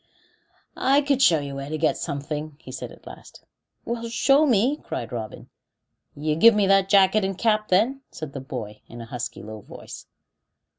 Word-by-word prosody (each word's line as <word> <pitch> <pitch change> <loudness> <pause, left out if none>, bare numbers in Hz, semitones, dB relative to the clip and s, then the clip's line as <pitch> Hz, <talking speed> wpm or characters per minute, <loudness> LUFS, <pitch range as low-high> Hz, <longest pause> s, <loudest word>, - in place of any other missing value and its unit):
"I 275 +2 +3
could 280 -2 +1
show 165 -11 +5
you 140 -1 -6
where 140 +1 -6
to 155 - -2
get 155 0 +1
something," 150 0 -5
he - - -11
said - - -6
at - - -16
last. - - -13 0.4
"Well, 235 0 -4
show 275 +5 +4
me," 250 +4 +3
cried 120 - -6
Robin. 110 -3 -7 0.6
"You 150 +1 -1
give 225 +7 +7
me 205 -1 +3
that 195 0 +3
jacket 200 +1 +5
and 190 -1 -2
cap, 215 -1 +1
then," 230 +9 +2 0.2
cried 155 -3 -6
the 135 - -6
boy, 115 -6 -7
in 120 - -11
a 115 - -7
husky, 125 +1 -6
low 110 0 -8
voice. - - -11
175 Hz, 185 wpm, -24 LUFS, 140-230 Hz, 0.6 s, give